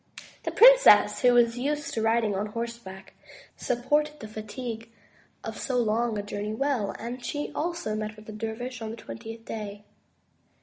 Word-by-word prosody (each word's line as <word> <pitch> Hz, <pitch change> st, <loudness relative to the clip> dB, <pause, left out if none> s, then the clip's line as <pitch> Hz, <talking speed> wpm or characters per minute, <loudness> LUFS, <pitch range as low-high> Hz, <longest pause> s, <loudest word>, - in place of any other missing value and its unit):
The -, -, -1 dB
princess -, -, +7 dB
who 250 Hz, -2 st, +5 dB
was 235 Hz, 0 st, +4 dB
used 290 Hz, +2 st, -2 dB
to 225 Hz, -, -1 dB
riding 225 Hz, -1 st, +2 dB
on 205 Hz, +2 st, -1 dB
horseback, 230 Hz, -4 st, -7 dB, 0.4 s
supported 295 Hz, +5 st, 0 dB
the 215 Hz, -, -7 dB
fatigue 225 Hz, +2 st, -6 dB, 0.5 s
of -, -, -6 dB
so 255 Hz, -3 st, -1 dB
long 230 Hz, -1 st, +1 dB
a 205 Hz, -, -2 dB
journey 205 Hz, +1 st, -4 dB
well, 260 Hz, -5 st, -1 dB
and 240 Hz, +2 st, -6 dB
she 290 Hz, +4 st, -3 dB
also 340 Hz, -9 st, -2 dB
met 215 Hz, 0 st, -4 dB
the 215 Hz, -, -8 dB
dervish 225 Hz, +3 st, -5 dB
on 220 Hz, -, -4 dB
the 225 Hz, -, -5 dB
twen 115 Hz, -, -9 dB
tieth 225 Hz, 0 st, -9 dB
day. 210 Hz, -2 st, -6 dB
230 Hz, 165 wpm, -27 LUFS, 215-250 Hz, 0.5 s, princess